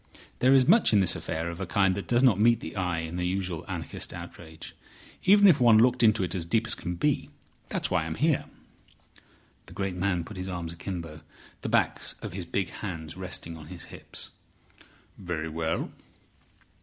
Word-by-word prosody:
There 130 +2 +5
is 130 -1 +5
much 220 - +5
in 105 - +6
this 90 -2 +4
affair 80 +1 -3
of 85 - -8
a 95 - -3
kind 95 +1 +3
that 100 +1 -5
does 120 +1 +3
not 115 -7 +5
meet 115 +1 +5
the 80 - -8
eye 90 -4 -1
in 80 +2 -5
a - - -1
usual 90 -2 -2
anarchist - - -5
outrage, 80 -1 -10 0.5
even 205 +2 +7
if 155 -8 +5
one 115 -3 +7
looked 125 +2 +4
into 110 -3 +4
it 90 -1 -2
as 90 -4 -1
deep 110 +8 +1
as - - 0
can 90 0 -4
be. 85 - 0 0.4
That's - - -2
why 90 -2 +3
I 80 - -4
am 80 - -4
here." 155 -1 +1 1.2
The - - -11
great 95 -2 -3
man 90 -1 0
put 105 +4 -10
his 90 0 -4
arms 85 -3 -4
akimbo, 85 -3 -6 0.4
the - - -3
backs - - +1
of - - -5
his 90 -2 -4
big 90 +1 -2
hands 80 -6 -6
resting 90 -3 -5
on 80 -2 -11
his 90 -1 -8
hips. - - -7 0.9
"Very 85 -4 -3
well. 80 0 -2
90 Hz, 195 wpm, -28 LUFS, 85-110 Hz, 1.2 s, even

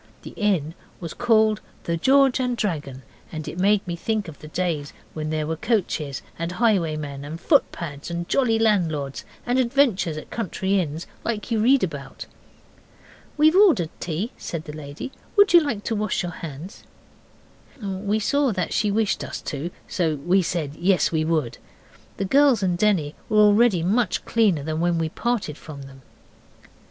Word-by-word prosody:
The - - -8
inn 185 -8 0 0.3
was 170 -3 -6
called 220 -3 +3 0.2
the 170 - -1
'George 265 +8 +4
and 250 -2 -1
Dragon', 145 - -3 0.3
and 155 -2 -6
it 175 - -6
made 205 +2 +3
me 175 - -2
think 215 +3 -2
of 160 - -10
the 155 - -10
days 155 -3 -2 0.2
when 155 -1 -4
there 155 -1 -1
were 160 +1 -2
coaches 160 - -1 0.2
and 170 +1 -3
highwaymen 155 - 0
and 155 +3 -7
foot 285 - +3
pads 145 -3 -7
and 170 0 -4
jolly 240 -5 +2
landlords, 165 -11 0 0.2
and 245 +1 +1
adventures 235 - +2
at 155 - -9
country 195 -2 -1
inns, 160 -1 -3 0.2
like 230 0 -3
you 225 - +2
read 260 +4 +4
about. 140 -6 -5 1.1
'We've 310 +3 +5
ordered 320 - +5
tea,' 175 +7 -3
said 165 -2 -5
the 150 - -8
lady. 150 - -7 0.2
'Would 405 -3 +5
you 345 - +10
like 240 -9 -3
to 225 - -1
wash 210 -2 -1
your 175 - -3
hands?' 165 +3 -9 1.0
We 200 0 -2
saw 280 +4 +1
that 185 -2 -2
she 210 - +1
wished 210 0 0
us - - -5
to, 150 +3 -4 0.2
so 165 -4 0
we 175 +7 +2
said 160 -4 -3
yes, 185 0 +2
we 160 -1 +1
would. 155 -7 -1 0.6
The 195 - -1
girls 270 -1 +4
and 180 -2 +1
Denny 175 -6 +1 0.2
were 215 - +1
already 210 -3 +5
much 215 +6 +1
cleaner 205 -10 +2
than 155 +1 -3
when 170 0 +1
we 165 -1 -1
parted 215 -6 -2
from 145 -3 -9
them. 135 0 -13
180 Hz, 170 wpm, -23 LUFS, 155-220 Hz, 1.1 s, you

